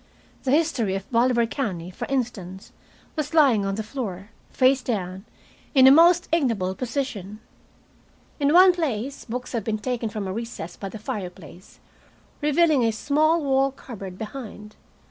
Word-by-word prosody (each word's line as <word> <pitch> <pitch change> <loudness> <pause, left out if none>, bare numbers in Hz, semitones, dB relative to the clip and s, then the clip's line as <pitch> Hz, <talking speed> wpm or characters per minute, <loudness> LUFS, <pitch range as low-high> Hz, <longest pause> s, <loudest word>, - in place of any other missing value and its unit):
"The - - 0
History 270 - +1
of 195 0 -5
Bolivar 235 0 +3
County," 185 -8 -4
for - - -6
instance, 205 -8 -4 0.4
was 305 +1 -3
lying 250 -10 +4
on 195 - -1
the 220 - -3
floor, 210 -4 -6 0.2
face 260 +1 +3
down, 190 -5 -4 0.5
in 260 -1 +7
a 265 - +9
most 345 +4 +6
ignoble 230 - +1
position. 225 -4 -4 1.0
In 285 0 +2
one 365 +2 +7
place 275 -6 -3
books 250 +1 -5
had 230 -4 -2
been 215 +1 -1
taken 235 0 -3
from 205 -2 -5
a 185 - -3
recess 225 -6 -6
by 195 - -6
the 220 - -8
fireplace, 185 - -8 0.6
revealing 300 -2 +3
a 230 - +3
small 305 +7 +1
wall 270 0 +2
cupboard 200 -9 -9
behind. 210 -2 -8
235 Hz, 150 wpm, -24 LUFS, 200-275 Hz, 1.0 s, a